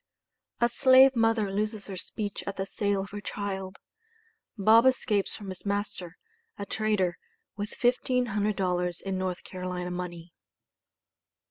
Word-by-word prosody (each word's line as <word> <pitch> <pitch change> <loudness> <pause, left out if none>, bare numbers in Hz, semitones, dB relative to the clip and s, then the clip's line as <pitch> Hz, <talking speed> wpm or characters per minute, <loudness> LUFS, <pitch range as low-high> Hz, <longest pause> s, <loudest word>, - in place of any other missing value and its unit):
A 235 - +4
SLAVE 260 +2 +6
MOTHER 225 -3 +2
LOSES 210 +1 -2
HER 195 - -6
SPEECH 205 +2 -5
AT 200 - -4
THE 195 - -1
SALE 200 0 -1
OF 195 - -8
HER 205 0 -6
CHILD 195 -1 -4 0.8
BOB 225 +5 +6
ESCAPES 215 -6 +1
FROM 205 -3 -8
HIS 185 -1 -8
MASTER, 200 -4 -3 0.4
A 200 - -4
TRADER, 200 -4 0 0.4
WITH 205 +1 -6
$1500 205 -8 +1
IN 195 -1 -2
NORTH 185 -1 -3
CAROLINA 180 -1 -5
MONEY. 175 -1 -6
200 Hz, 130 wpm, -28 LUFS, 185-215 Hz, 0.8 s, SLAVE